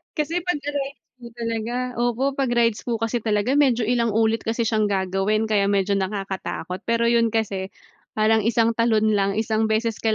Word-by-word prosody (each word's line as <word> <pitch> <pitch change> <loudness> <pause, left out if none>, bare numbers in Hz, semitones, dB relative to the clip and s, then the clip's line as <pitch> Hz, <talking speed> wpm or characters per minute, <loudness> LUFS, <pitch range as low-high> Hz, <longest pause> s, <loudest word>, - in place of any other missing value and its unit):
Kasi 315 +2 -1
pag 355 -4 0
sa 290 - -3
rides 280 -1 -4 0.2
po 240 - -11
talaga, 230 0 -3 0.2
opo, 240 +1 0
pag 270 -3 +1
rides 230 -2 +2
po 240 - -1
kasi 230 +2 0
talaga 220 +4 0
medyo 255 -5 +3
ilang 235 -1 +1
ulit 225 0 +1
kasi 230 +1 0
siyang 220 -2 +1
gagawin 195 +2 0
kaya 200 -2 +3
medyo 200 0 +1
nakakatakot. 190 -1 -4
Pero 230 0 +2
yun 230 -1 +2
kasi 200 -4 -1 0.5
parang 220 +1 +3
isang 230 0 +3
talon 220 -2 +3
lang 200 -2 +1
isang 220 +1 0
beses 220 +1 0
ka 220 -1 +1
225 Hz, 185 wpm, -23 LUFS, 210-235 Hz, 0.5 s, medyo